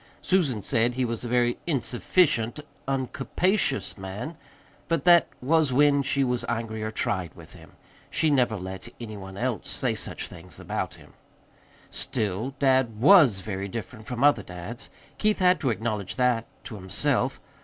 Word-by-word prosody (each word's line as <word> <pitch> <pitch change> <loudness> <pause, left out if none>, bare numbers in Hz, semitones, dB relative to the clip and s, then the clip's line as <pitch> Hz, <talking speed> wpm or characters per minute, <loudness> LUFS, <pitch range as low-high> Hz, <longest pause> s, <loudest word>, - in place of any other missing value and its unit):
Susan 145 - +1
said 120 -1 +1
he 130 0 +1
was 115 -1 -3
a - - -4
very 120 0 +2
"insufficient, 130 -2 +1 0.3
uncapacious" 135 - 0
man 100 - -6 0.5
but 165 -5 0
that 175 -2 +6 0.2
was 155 0 +3
when 140 +2 +4
she 140 0 +1
was 125 -2 -1
angry 115 -2 -3
or 110 - -2
tried 95 -6 -1
with - - -13
him. - - -15 0.4
She 155 -1 +2
never 125 -6 +2
let 95 +4 -7
any 110 -3 -7
one 95 -1 -9
else 120 -3 -2
say - - 0
such - - -4
things 90 0 -11
about - - -3
him. - - -17 0.8
Still, 110 +3 -2
dad 130 -5 +2
WAS 135 - +6
very 95 0 -4
different 110 +1 -7
from 125 +1 -3
other 145 -7 +5
dads. 90 +6 -8 0.3
Keith 215 -1 +2
had 180 -1 +4
to 135 - 0
acknowledge 110 -4 -2
that 125 -3 +1 0.2
to 125 - -8
himself. 125 +7 0
120 Hz, 155 wpm, -26 LUFS, 110-140 Hz, 0.8 s, that